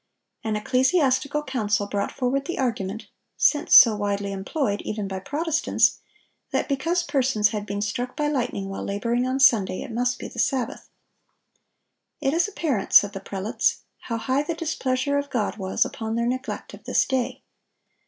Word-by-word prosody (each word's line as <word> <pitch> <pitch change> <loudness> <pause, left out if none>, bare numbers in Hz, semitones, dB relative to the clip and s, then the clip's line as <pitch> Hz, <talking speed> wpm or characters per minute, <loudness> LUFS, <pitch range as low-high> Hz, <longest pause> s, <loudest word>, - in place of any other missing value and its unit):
An 220 -1 -1
ecclesiastical 265 +5 +1
council 210 -7 0
brought 200 0 -2
forward 270 +2 -1
the 345 - -4
argument, 220 -4 -2 0.3
since 295 -1 +3
so 230 -4 +8
widely 200 -1 -2
employed, 205 +3 -2
even 210 -2 -4
by 190 -1 -4
Protestants, 315 - +1 0.5
that - - -1
because 330 +5 0
persons 265 -9 +2
had 210 -1 -4
been 200 +1 -2
struck 245 +4 -3
by 295 - +1
lightning 245 -8 -2
while 195 - -5
laboring 235 +5 -1
on 260 +1 -1
Sunday, 215 -8 +4
it - - -8
must 245 +2 0
be - - -7
the 235 - -9
Sabbath. 250 -1 -1 1.3
"It 270 - 0
is 340 +4 +2
apparent," 305 - -2
said 205 0 +7
the 195 - -5
prelates, 195 +2 -1 0.2
"how 230 - -4
high 260 +4 0
the 320 +3 -3
displeasure 285 -3 -1
of 285 0 -5
God 220 -4 -1
was 190 -2 0
upon 220 0 -4
their 235 0 0
neglect 255 +2 -4
of - - -13
this - - +2
day." 260 0 -2
245 Hz, 165 wpm, -24 LUFS, 210-275 Hz, 1.3 s, so